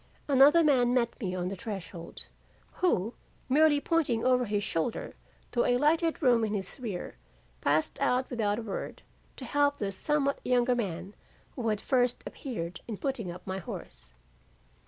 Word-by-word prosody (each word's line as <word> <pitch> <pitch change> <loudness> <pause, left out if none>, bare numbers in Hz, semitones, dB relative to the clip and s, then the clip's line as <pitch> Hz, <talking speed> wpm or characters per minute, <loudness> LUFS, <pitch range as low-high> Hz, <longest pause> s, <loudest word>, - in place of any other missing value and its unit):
Another 285 +4 +6
man 250 -5 +4
met 245 +1 0
me 185 -4 -2
on 180 0 -2
the 195 - -4
threshold 190 -4 -7 0.6
who 230 - +2 0.3
merely 295 +2 +5
pointing 285 -8 +1
over 250 -1 +3
his 205 -1 -1
shoulder 185 +3 -2 0.4
to 240 - +2
a 245 - +3
lighted 320 +4 +2
room 240 -3 +4
in 215 -1 0
his 195 +5 -5
rear, 210 -8 -5 0.4
passed 155 +2 +1
out 255 +1 +2
without 210 -4 0
a 235 - -4
word, 205 -3 -5 0.3
to 260 - -8
help 285 +2 +2
the 200 -2 -2
somewhat 280 +6 0
younger 250 0 +3
man, 190 -5 -3 0.4
who 240 -4 -3
had 210 -1 0
first 250 -1 +1
appeared, 170 -10 -5
in 220 -3 -4
putting 260 -8 -3
up 180 +1 -8
my 190 0 -3
horse. - - -9
240 Hz, 160 wpm, -29 LUFS, 195-270 Hz, 0.6 s, Another